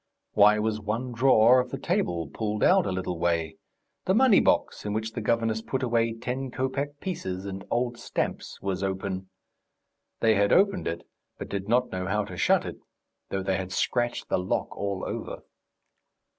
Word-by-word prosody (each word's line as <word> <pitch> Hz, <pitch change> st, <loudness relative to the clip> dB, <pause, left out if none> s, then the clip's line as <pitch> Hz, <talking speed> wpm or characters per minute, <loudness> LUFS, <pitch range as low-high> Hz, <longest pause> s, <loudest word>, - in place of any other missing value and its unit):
Why 105 Hz, +1 st, +6 dB
was 110 Hz, 0 st, -1 dB
one 115 Hz, +5 st, -3 dB
drawer 120 Hz, 0 st, +5 dB
of 125 Hz, 0 st, -1 dB
the -, -, -4 dB
table 85 Hz, -2 st, -1 dB
pulled 105 Hz, +7 st, -3 dB
out -, -, +5 dB
a -, -, -1 dB
little 90 Hz, -2 st, -3 dB
way? 85 Hz, -2 st, 0 dB, 0.5 s
The 190 Hz, -, +2 dB
money 250 Hz, -3 st, +6 dB
box, -, -, +1 dB
in 105 Hz, -, -3 dB
which 110 Hz, +1 st, -2 dB
the -, -, -5 dB
governess 115 Hz, -1 st, 0 dB
put 130 Hz, +3 st, -3 dB
away 115 Hz, -2 st, +1 dB
ten 130 Hz, +3 st, -4 dB
kopeck 140 Hz, +3 st, -3 dB
pieces 95 Hz, -, -4 dB
and 95 Hz, 0 st, -6 dB
old 120 Hz, 0 st, -1 dB
stamps, -, -, -3 dB
was 95 Hz, -1 st, -2 dB
open. 95 Hz, -1 st, -3 dB, 0.9 s
They 110 Hz, -1 st, +4 dB
had 100 Hz, -1 st, +2 dB
opened 200 Hz, 0 st, +3 dB
it, 85 Hz, +1 st, -4 dB, 0.3 s
but -, -, -7 dB
did 100 Hz, +1 st, -4 dB
not 125 Hz, +2 st, +2 dB
know 95 Hz, 0 st, -3 dB
how 105 Hz, +1 st, 0 dB
to -, -, -8 dB
shut -, -, +3 dB
it, -, -, -7 dB, 0.5 s
though 95 Hz, -1 st, -2 dB
they 95 Hz, 0 st, 0 dB
had 95 Hz, -1 st, -5 dB
scratched 120 Hz, +4 st, -1 dB
the -, -, +1 dB
lock 90 Hz, -, -2 dB
all 100 Hz, -1 st, -3 dB
over. -, -, -5 dB
105 Hz, 180 wpm, -27 LUFS, 95-125 Hz, 0.9 s, Why